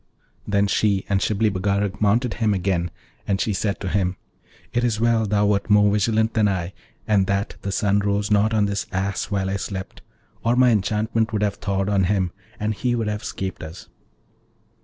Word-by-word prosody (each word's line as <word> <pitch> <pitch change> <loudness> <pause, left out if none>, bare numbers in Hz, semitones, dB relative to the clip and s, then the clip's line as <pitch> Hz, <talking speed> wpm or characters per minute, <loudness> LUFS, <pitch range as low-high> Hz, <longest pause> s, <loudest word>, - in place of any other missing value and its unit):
Then 100 0 +2
she 100 -1 +1
and 100 -1 +1
Shibli 105 +1 +1
Bagarag 100 +1 -1
mounted 115 +4 +2
him 110 -3 +1
again, 90 -2 0 0.4
and 95 -1 +1
she 110 - 0
said 100 +1 -1
to 100 - -3
him, 95 -1 0 0.6
'It 120 - +1
is 115 -3 0
well 115 -1 +2
thou 105 0 +2
wert 100 0 +1
more 105 -1 +5
vigilant 110 +2 +1
than 110 -2 +3
I, 95 -2 -2 0.3
and 100 -3 +3
that 100 0 -1
the 100 - -3
sun 100 +1 +2
rose 100 +1 0
not 105 +1 +3
on 110 -2 +2
this 100 -1 -2
Ass 95 +1 -1
while 95 -2 -1
I 95 +1 -1
slept, 95 -1 -6 0.4
or 115 +1 +2
my 125 -1 +5
enchantment 110 +1 0
would 105 -1 0
have 100 -1 +1
thawed 95 -1 -1
on 100 -2 +2
him, 95 -2 0 0.3
and 105 +1 -1
he 120 +3 -1
would 115 -2 -1
have 105 +1 -4
'scaped 95 -1 -5
us.' 80 +2 -9
100 Hz, 195 wpm, -23 LUFS, 95-110 Hz, 0.6 s, more